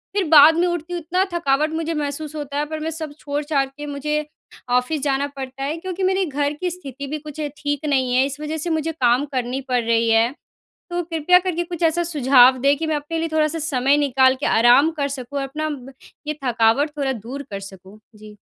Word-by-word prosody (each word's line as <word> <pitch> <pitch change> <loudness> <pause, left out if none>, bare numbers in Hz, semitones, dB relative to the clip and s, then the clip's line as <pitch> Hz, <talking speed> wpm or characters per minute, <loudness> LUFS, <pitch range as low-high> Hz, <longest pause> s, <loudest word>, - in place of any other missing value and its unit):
फिर 400 - +2
बाद 310 +1 +8
में 355 +1 +2
उठती 345 0 -3
हूँ 350 - -2
इतना 360 +4 0
थकावट 305 -2 +1
मुझे 325 0 -2
महसूस 300 +1 -4
होता 290 -1 -5
है 295 - 0
पर 310 +1 -5
मैं 320 +1 -3
सब 315 -2 -6
छोड़-छाड़ 285 -1 -1
के 295 +2 -9
मुझे 300 +1 -2 0.4
ऑफ़िस 250 +4 +1
जाना 280 0 0
पड़ता 265 0 -6
है 295 +3 -2
क्योंकि 375 +2 -5
मेरे 380 0 +2
घर 290 -1 -1
की 360 - 0
स्थिति 280 -6 -8
भी 305 +2 -3
कुछ 300 0 -10 0.2
ठीक 290 +1 -3
नहीं 260 -4 +1
है 260 - +5
इस 280 +2 -5
वज़ह 310 +1 -3
से 335 +3 -3
मुझे 320 0 -1
काम 255 -2 +2
करनी 255 +1 -2
पड़ 250 -1 +2
रही 230 0 +2
है। 225 +2 +3 0.6
तो 350 0 -1
कृपया 330 +2 +3
करके 350 -2 -2
कुछ 345 0 -5
ऐसा 330 +2 +2
सुझाव 265 -5 +5
दें, 280 +1 +4
कि 320 +1 -3
मैं 310 - 0
अपने 300 +3 -3
लिए 330 - -1
थोड़ा-सा 310 +1 +1
समय 280 -2 +2
निकाल 265 -2 +3
के - - -1
आराम 245 +7 +5
कर 280 -1 0
सकूँ 275 0 -6
और - - -2
अपना 310 +3 -4
ब 270 -2 -8 0.3
ये 305 0 -3
थकावट 240 +5 +2
थोड़ा 275 -2 0
दूर 250 +5 -7
कर 200 - -4
सकूँ। 195 +1 -12 0.2
जी। 210 0 -13
290 Hz, 220 wpm, -21 LUFS, 265-320 Hz, 0.6 s, बाद